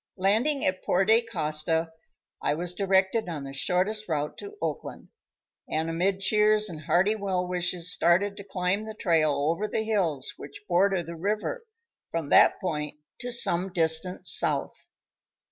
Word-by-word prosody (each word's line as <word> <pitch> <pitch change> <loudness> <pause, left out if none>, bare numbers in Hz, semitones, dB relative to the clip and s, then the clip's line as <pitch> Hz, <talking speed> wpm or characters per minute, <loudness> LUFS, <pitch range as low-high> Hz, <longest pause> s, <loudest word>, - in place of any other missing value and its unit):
Landing 225 +10 +1
at 185 0 0
Porte 220 +5 +2
Costa, 160 0 -1 0.5
I 145 - 0
was 175 +2 -4
directed 190 +2 +1
on 155 -4 -5
the 135 0 -8
shortest 190 +8 -1
route 150 -2 -2
to 410 +1 -10
Oakland, - - -5 0.6
and 160 +1 -1
amid 190 +4 0
cheers 210 +1 +4
and 160 -3 -8
hearty 175 +7 +2
well 190 -3 -2
wishes 180 0 0
started 190 +4 +2
to 200 - -8
climb 190 +2 -2
the 220 - -7
trail 165 -7 +2 0.2
over 200 +6 -2
the 220 - -2
hills 180 -11 -1
which 145 +7 -11
border 185 0 +2
the 170 +1 -8
river 215 - -3 0.4
from 165 -3 -4
that - - +5
point 150 -4 -4 0.2
to 245 - -5
some 190 -5 +3
distance 165 +1 +2
south. - - -1
180 Hz, 150 wpm, -26 LUFS, 165-210 Hz, 0.6 s, that